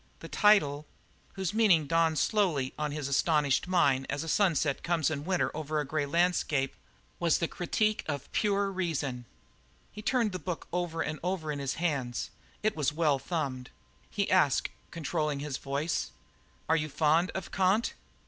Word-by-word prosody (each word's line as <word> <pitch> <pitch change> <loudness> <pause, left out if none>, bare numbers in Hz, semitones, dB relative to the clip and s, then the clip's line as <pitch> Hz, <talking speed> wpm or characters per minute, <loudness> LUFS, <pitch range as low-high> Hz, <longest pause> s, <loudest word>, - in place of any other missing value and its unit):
The - - -8
title, 150 -9 +3 0.5
whose 190 -1 -2
meaning 200 -9 +4
dawned 165 0 +2
slowly 165 - +1
on 150 -1 -2
his 145 -2 -3
astonished 145 +1 +2
mind 140 -8 +2
as 145 - -2
a - - -7
sunset 160 -6 +2
comes 165 -3 +1
in 145 -1 -4
winter 185 -1 0
over 155 0 -2
a 150 - -1
grey 145 0 -1
landscape, 155 -4 +1 0.5
was 170 -2 +3
The 170 - 0
Critique 215 +6 0
of 145 -3 -4
Pure 200 -1 +1
Reason. 145 -9 -2 0.7
He 210 - -8
turned 230 -1 +1
the 185 - -4
book 170 +1 -5
over 175 -2 -1
and 155 0 -4
over 175 -3 -2
in 145 - -4
his 135 -1 -2
hands. 140 -8 -2 0.3
It 215 0 +1
was 150 -2 +1
well 150 -3 +2
thumbed. 135 -4 -3 0.4
He - - -1
asked, - - +3 0.2
controlling 155 -3 -2
his 145 -2 -3
voice: 145 +4 -2 0.6
"Are 160 - +4
you 155 -1 -1
fond 160 +4 +2
of 190 -2 -5
Kant?" 195 +4 +2
160 Hz, 165 wpm, -30 LUFS, 145-180 Hz, 0.7 s, meaning